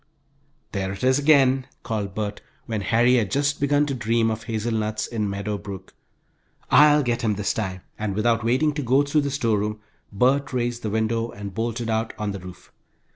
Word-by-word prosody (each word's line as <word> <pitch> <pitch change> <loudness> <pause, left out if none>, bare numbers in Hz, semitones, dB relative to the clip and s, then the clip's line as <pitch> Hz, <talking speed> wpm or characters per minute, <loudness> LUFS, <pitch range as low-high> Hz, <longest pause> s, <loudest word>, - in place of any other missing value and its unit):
"There 95 -2 -2
it 95 - -8
is 130 +2 +4
again," 135 -3 +4 0.2
called 105 -4 -3
Bert, 105 -1 -3 0.2
when 110 -3 -3
Harry 120 +4 +3
had 110 -5 +1
just 145 +5 0
begun 145 +1 +2
to 140 - -2
dream 115 -2 +1
of 110 +1 -5
hazelnuts 110 -1 -2
in 110 -3 -2
Meadow 100 +1 -3
Brook. 95 0 -9 0.8
"I'll 150 +1 +6
get 120 -1 -1
him 110 -4 +1
this 100 0 -1
time!" 95 -4 -3 0.2
and 105 -2 -2
without 115 +1 +1
waiting 130 +6 +2
to 145 - -3
go 135 +2 +3
through 145 +1 +1
the 140 - -2
storeroom, 105 -6 0 0.3
Bert 135 +7 +1
raised 120 -1 -1
the 110 - -3
window 110 +2 0
and 100 -2 -8
bolted 115 +2 -2
out 110 0 -1
on 105 -1 -2
the 100 - -6
roof. 90 0 -12
115 Hz, 185 wpm, -24 LUFS, 105-130 Hz, 0.8 s, I'll